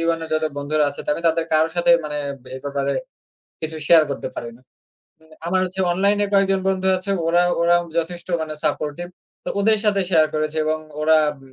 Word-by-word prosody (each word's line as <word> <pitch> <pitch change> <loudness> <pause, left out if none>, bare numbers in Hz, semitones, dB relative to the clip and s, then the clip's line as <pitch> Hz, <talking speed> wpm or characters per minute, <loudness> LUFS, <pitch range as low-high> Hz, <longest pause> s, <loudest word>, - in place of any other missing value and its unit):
জীবনের 165 -1 -1
যারা 155 0 +1
বন্ধুরা 150 +1 +1
আছে। 140 - -6
তা - - -2
আমি 165 - -6
তাদের 165 0 0
কারো 155 +1 +4
সাথে 175 0 +3
মানে 150 -1 -3 0.4
এ - - -7
ব্যাপারে 140 -1 -2 0.7
কিছু 160 0 -4
শেয়ার 165 -2 +7
করতে - - -4
পারি 120 - -5
না। - - -24 0.9
আমার 185 +2 +1
হচ্ছে 185 +1 -4
অনলাইন 200 +3 +2
এ - - -1
কয়েকজন 195 -1 +3
বন্ধু 190 0 +1
আছে 185 +2 -4 0.2
ওরা 175 +1 +4 0.2
ওরা 170 +1 +4 0.2
যথেষ্ট 175 +2 -4
মানে 155 -1 -5
সাপোর্টিভ। 155 +4 -2 0.4
তো - - -3
ওদের 215 +1 +3
সাথে 205 -2 +3
শেয়ার 160 -3 +5
করেছি 155 0 -2
এবং 155 0 0 0.2
ওরা 160 +1 +4
আব 145 - -11
165 Hz, 195 wpm, -21 LUFS, 155-185 Hz, 0.9 s, শেয়ার